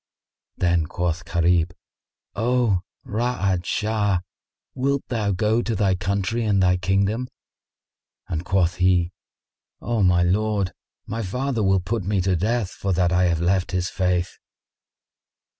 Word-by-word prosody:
Then 85 -3 +2
quoth 90 0 -2
Gharib, 85 0 +2 0.6
"O 115 -3 +2 0.3
Ra'ad 100 -5 -1
Shah, 105 -4 0 0.5
wilt 135 +1 0
thou 110 -4 0
go 105 +5 +1
to 115 -1 -2
thy 95 -1 +2
country 100 +5 -1
and 105 -3 +2
thy 90 -1 +3
kingdom?" 100 +6 0 1.0
and 80 -1 -3
quoth 90 -3 +1
he, 90 -1 +3 0.7
"O, 120 -2 -1
my 90 -2 +4
lord, 100 +1 +1 0.3
my 115 +3 -4
father 125 +4 -2
will 95 -2 +3
put 110 +3 -2
me 100 +1 0
to 95 0 +1
death, 105 +2 0
for 95 -1 -2
that 90 -1 +2
I 90 +1 +3
have 85 -2 +1
left 90 +1 +1
his 90 0 0
faith." 90 -2 -1
95 Hz, 135 wpm, -23 LUFS, 90-110 Hz, 1.0 s, my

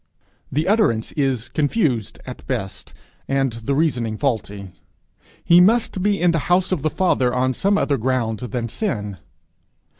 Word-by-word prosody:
The 155 +5 0
utterance 195 - +2
is 135 -6 -1
confused 145 - -1
at - - -10
best, 95 0 -4 0.4
and 135 -2 0
the 115 +4 -2
reasoning 120 -8 0
faulty. 105 -8 -3 0.7
He 175 +1 +6
must 215 0 +2
be 205 +1 +1
in 175 -1 +3
the 165 - 0
house 180 +1 +2
of 180 -6 0
the 155 - +1
Father 140 -8 +1
on 130 +1 0
some 200 +8 +1
other 140 -8 +1
ground 115 -3 -1
than 120 -1 -4
sin. 105 - -3
135 Hz, 150 wpm, -21 LUFS, 115-175 Hz, 0.7 s, He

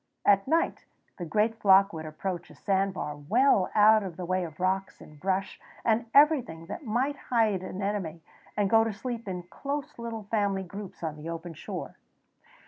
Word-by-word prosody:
At 195 +1 +4
night 330 +3 +1 0.3
the 175 - -3
great 215 +6 +1
flock 195 0 +6
would 160 -1 -6
approach 175 +3 -4
a - - -14
sandbar, 190 -6 -1
well 200 - +3
out 215 +1 +7
of 185 -5 -6
the 180 - -4
way 185 +1 0
of 155 -1 -10
rocks 190 +1 -1
and 150 -1 -14
brush 190 +2 -1 0.3
and 230 +1 +2
everything 275 - +4
that 305 - -7
might 260 +5 0
hide 220 -6 +2
an 185 +1 -5
enemy, 180 -6 -3 0.3
and 205 -1 +3
go 225 +3 +5
to 225 -1 -2
sleep 235 +1 -5
in 180 -2 -4
close 275 +9 -5
little 230 -2 -5
family 200 -2 0
groups 195 0 -9
on 155 -2 -3
the 155 +2 -7
open 165 0 -6
shore. - - -7
195 Hz, 180 wpm, -28 LUFS, 180-225 Hz, 0.3 s, out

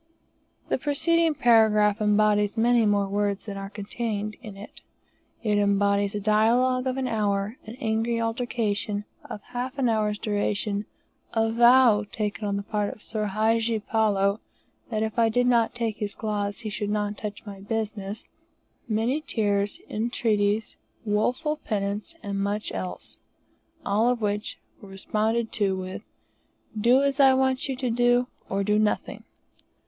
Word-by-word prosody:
The - - +1
preceding 320 +3 +2
paragraph 220 -3 +4
embodies 210 0 +2
many 235 0 +4
more 200 -1 +2
words 200 0 -1
than 205 -2 -6
are 195 0 -6
contained 210 +1 -4
in 210 -5 -9
it. 205 +2 -11 0.6
It 210 -2 +2
embodies 200 0 +2
a - - -1
dialogue 240 +5 +2
of 260 0 -1
an 265 -1 -1
hour, 205 0 -1
an 220 - -7
angry 225 -1 0
altercation 225 -3 -2 0.2
of 205 - -8
half 250 +2 -5
an 265 -3 +2
hour's 215 -2 +1
duration, 205 0 -1 0.5
a 225 0 +1
vow 235 -2 +6
taken 210 0 -3
on 200 0 -1
the 200 - -4
part 210 0 -1
of 215 - -13
Soor 215 -1 -2
Hadji 225 +2 +1
Palloo, 205 -2 +1 0.5
that 220 -1 -1
if 220 +2 -2
I 230 -1 +4
did 245 +3 +2
not 235 -2 +2
take 230 -3 -2
his 205 -1 -3
cloths 205 -2 -3
he 215 -2 -5
should 205 0 -3
not 210 0 -1
touch 210 +1 -7
my 200 -2 -8
business, 210 0 -4 0.6
many 235 +7 0
tears, 205 -7 -1
entreaties, 215 -2 0 0.3
woeful 250 +9 0
penitence, 210 +4 -3
and 200 -1 -3
much 205 +2 -2
else, 90 -1 -5 0.7
all 210 +4 +2
of 250 -1 0
which 210 0 -2 0.2
were 200 - -12
responded 220 +4 -1
to 200 -3 0
with, 185 +1 -6 0.7
"Do 240 +5 +4
as 280 0 0
I 270 -1 +7
want 265 0 +1
you 265 - -1
to 250 -2 -2
do, 245 +1 +3 0.2
or 195 +1 0
do 210 +1 +2
nothing." 215 -1 -1
215 Hz, 155 wpm, -26 LUFS, 205-235 Hz, 0.7 s, I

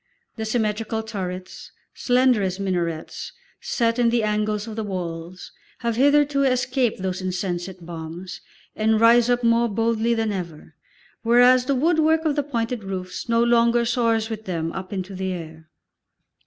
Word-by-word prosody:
The 220 - -4
symmetrical 220 0 -1
turrets, 185 -4 -6 0.2
slender 250 -3 +2
as 185 0 -2
minarets, 175 -4 -3 0.3
set 240 - 0
in 235 -1 +4
the 230 -1 +1
angles 210 0 -1
of 220 -2 -7
the 220 - -3
walls, 175 -2 -6 0.3
have 235 -2 -1
hitherto 285 +2 +3
escaped 255 -5 +1
those 185 0 -2
insensate 180 -1 -4
bombs 170 +2 -7 0.3
and 220 0 +2
rise 235 +1 +5
up 245 0 +1
more 230 0 +3
boldly 230 +2 +1
than 225 -1 0
ever, 170 -5 -6 0.5
whereas 245 +2 +5
the 275 - +1
woodwork 320 +2 +2
of 300 -2 +1
the 290 - +2
pointed 235 -5 -3
roofs 185 +2 -6
no 230 0 +3
longer 235 0 +3
soars 230 -2 +1
with 220 -1 -6
them 165 -3 -2
up 190 +1 -7
into 190 -1 -4
the 190 0 -3
air. 160 -2 -9
220 Hz, 155 wpm, -23 LUFS, 185-240 Hz, 0.5 s, rise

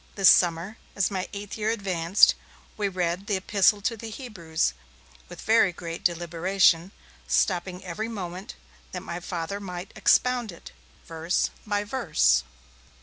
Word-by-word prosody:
This 195 -2 +6
summer, 175 +4 +2 0.2
as 200 0 +1
my 190 -1 -3
eighth 205 +1 -7
year 215 +1 0
advanced, 190 -4 +3 0.4
we 205 -1 -1
read 180 0 -2
the 205 - +1
'Epistle 200 +2 +2
to 230 +3 -1
the 225 0 -8
Hebrews', 175 - -2 0.6
with - - -10
very 220 -4 +4
great 170 -1 -7
deliberation, 175 +1 +2 0.4
stopping 180 0 0
every 205 +5 -4
moment, 185 -3 -6 0.4
that - - -5
my 170 - -5
Father 175 +2 -4
might 180 -1 -7
expound 240 +2 +2
it, 170 - -13 0.3
verse 165 +2 -1 0.2
by 205 0 0
verse. 65 - +2
190 Hz, 140 wpm, -26 LUFS, 170-205 Hz, 0.6 s, This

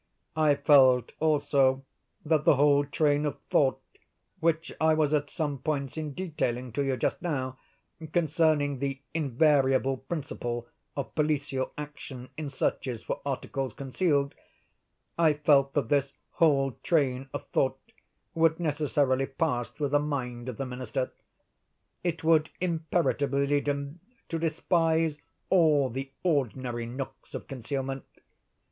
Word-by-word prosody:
I 155 -2 +4
felt, 130 -4 +5
also, 140 -3 +2 0.4
that 155 -1 +2
the - - +5
whole 145 +1 +4
train 145 0 +1
of 145 -2 -2
thought, 135 -2 +3 0.6
which 160 0 0
I 160 0 +4
was 155 -1 +2
at 145 -1 +1
some 145 -5 -2
pains 140 -1 -2
in 155 -3 -4
detailing 130 -9 -2
to 140 +6 -1
you 135 -2 0
just - - -1
now, 130 -6 -3 0.5
concerning 155 -4 +2
the 135 0 -2
invariable 135 -3 +2
principle 125 -5 -4 0.3
of 140 - -4
policial 145 -3 0
action 145 -4 -8
in 155 -1 -4
searches 130 -3 -2
for - - -4
articles 135 -2 -3
concealed—I 145 +2 -2
felt 140 -2 +3
that 145 - 0
this 140 -1 +1 0.2
whole 140 -4 +3
train 135 -5 +1
of 145 0 -5
thought 130 0 +1 0.5
would 165 -1 +3
necessarily 145 -4 +1
pass 135 -4 -1
through 145 -2 -3
the 145 +1 +3
mind 130 -4 -3
of 120 - -6
the 135 - -3
Minister. 130 0 -3 0.9
It 170 -1 -2
would 160 -1 +4
imperatively 160 -5 0
lead 145 +1 0
him 140 +3 -2 0.3
to 165 - -2
despise 165 -1 +1 0.3
all 155 -7 +4
the 135 +3 -4
ordinary 130 - -1
nooks 130 +3 -7
of - - -6
concealment. 135 +1 -4
145 Hz, 130 wpm, -28 LUFS, 135-155 Hz, 0.9 s, felt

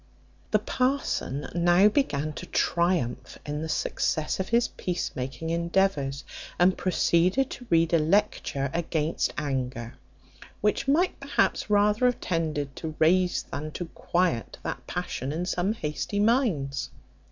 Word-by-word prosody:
The - - +4
parson 255 - -1
now 175 +3 +5
began 155 - 0
to 180 - -8
triumph 170 -8 0
in 150 +1 -3
the 160 - -4
success 155 +1 -1
of 190 - -2
his 235 +1 +3
peace 180 -1 -3
making 135 +5 -4
endeavours, 170 -5 0 0.3
and 180 +1 +4
proceeded 185 +7 +2
to 245 - -8
read 165 0 +3
a 165 - +6
lecture 150 -5 +1
against 165 -2 0
anger, 130 -5 -3 0.7
which 210 +6 0
might 330 +7 +2
perhaps - - 0
rather 210 +4 +4
have 245 - 0
tended 155 -5 -2
to 155 -2 -5
raise 180 +3 +3
than 155 +2 -4
to 175 - -4
quiet 170 - 0
that - - -5
passion 130 +3 -3
in 165 +4 -2
some 185 +3 0
hasty 160 +2 -3
minds. 180 - +1
170 Hz, 135 wpm, -27 LUFS, 150-195 Hz, 0.7 s, a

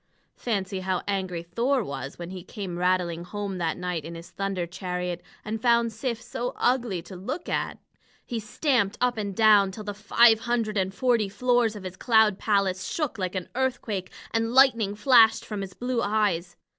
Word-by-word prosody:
Fancy 195 -4 -2
how 185 -1 -2
angry 185 -4 -2
Thor 235 +9 0
was 135 -4 -6
when 175 +1 -7
he 185 -2 -7
came 190 -3 -6
rattling 180 -2 +1
home 195 +1 -5
that 165 -2 -1
night 180 -3 -3
in 165 +2 -7
his 165 +1 -10
thunder 195 -3 -2
chariot 180 0 -4 0.2
and 215 +1 -3
found 235 -1 +3
Sif 235 +1 -3
so 245 +1 -4
ugly 240 -8 0
to 185 +2 -10
look 250 - -5
at! - - -2 0.5
He 235 - -3
stamped 220 -1 0
up 250 0 +2
and 200 -3 -4
down 210 -2 +6
till 210 +3 -8
the 205 0 -4
five 225 +2 +5
hundred 230 -2 -1
and 190 -1 0
forty 230 -1 +1
floors 240 +1 +1
of 205 - -8
his 185 0 -7
cloud 220 -4 +4
palace 195 -3 +1
shook 300 -9 -2
like 185 0 -2
an 185 -2 -4
earthquake, 240 -7 -2 0.2
and 225 +1 0
lightning 235 -7 +5
flashed 225 -1 +5
from 210 -2 -4
his 190 -2 -7
blue 245 -1 -1
eyes. 200 -5 0
205 Hz, 180 wpm, -26 LUFS, 185-230 Hz, 0.5 s, down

